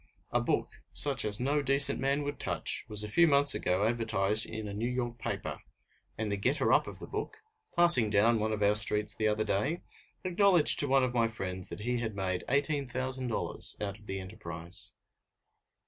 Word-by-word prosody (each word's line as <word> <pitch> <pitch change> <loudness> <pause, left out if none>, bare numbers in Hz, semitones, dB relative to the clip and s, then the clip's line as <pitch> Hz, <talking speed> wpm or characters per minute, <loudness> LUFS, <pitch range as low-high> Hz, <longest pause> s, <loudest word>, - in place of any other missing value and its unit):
A - - +1
book - - -3
such 140 -3 +3
as 105 -1 -3
no 140 +4 0
decent 140 0 +5
man 140 +2 -1
would 145 -1 -6
touch - - -1
was 105 -1 +4
a - - -4
few 170 +10 +3
months 140 -1 +4
ago 95 +3 -1
advertised 110 -3 0
in 110 -1 -7
a 100 - -7
New 115 +4 -3
York 120 -1 -4
paper, - - -5 0.6
and 110 -1 -3
the 100 - -2
getter 130 +9 0
up - - +2
of - - -8
the - - -9
book, - - -6 0.4
passing 170 - +4
down 110 +3 +2
one 110 +1 -2
of 105 -1 -2
our 100 +1 +3
streets 105 0 +4
the 110 - -1
other 105 0 0
day, 140 - -2 0.4
acknowledged 185 -3 +4
to 145 - +8
one 135 0 +2
of 125 -1 -2
my 115 -2 +1
friends 95 -4 -5
that - - -8
he 120 +2 -2
had 115 -3 -5
made 95 -2 -3
$18,000 130 -3 -3
out 105 0 -5
of 105 - -20
the 95 - -5
enterprise. 90 -3 -10
115 Hz, 195 wpm, -29 LUFS, 105-135 Hz, 0.6 s, to